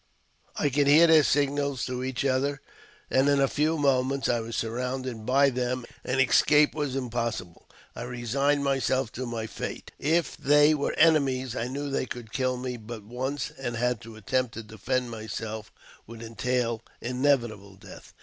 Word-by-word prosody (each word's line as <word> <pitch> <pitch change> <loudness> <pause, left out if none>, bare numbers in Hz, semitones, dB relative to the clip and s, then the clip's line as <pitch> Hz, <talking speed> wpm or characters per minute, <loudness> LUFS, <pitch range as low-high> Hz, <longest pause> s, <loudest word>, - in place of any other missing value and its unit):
I 145 - +1
could 140 +1 +2
hear 155 +4 +7
their 160 -2 +7
signals 140 -1 0
to 125 0 -4
each 130 +1 -2
other, 140 +2 +1 0.5
and 135 +2 +4
in 140 -1 +3
a 135 - +4
few 155 +4 0
moments 135 -1 +1
I 120 - +1
was 115 0 -5
surrounded 125 0 -3
by 140 +2 +4
them, 125 0 -2 0.2
and 130 +1 -1
escape 150 +3 +5
was 145 -4 -2
impossible. 120 -9 -4 0.3
I - - -6
resigned 125 +4 0
myself 135 -3 0
to 130 +1 -5
my 115 -2 -3
fate: - - -6
if 160 +1 +1
they 150 +2 +5
were 145 -2 -1
enemies, 135 -6 +3
I 120 - -2
knew 140 +2 -4
they 135 - -1
could 115 -3 -8
kill 130 -1 0
me 125 0 -4
but 110 -1 -9
once, 130 +5 -4
and 120 -3 -4 0.2
to 115 -1 -11
attempt 125 +3 -1
to 115 - -6
defend 120 +4 -2
myself 110 -1 -6 0.4
would 115 +1 -9
entail 115 0 -1 0.2
inevitable 120 -6 0
death. 95 -1 -14
130 Hz, 165 wpm, -27 LUFS, 115-140 Hz, 0.5 s, hear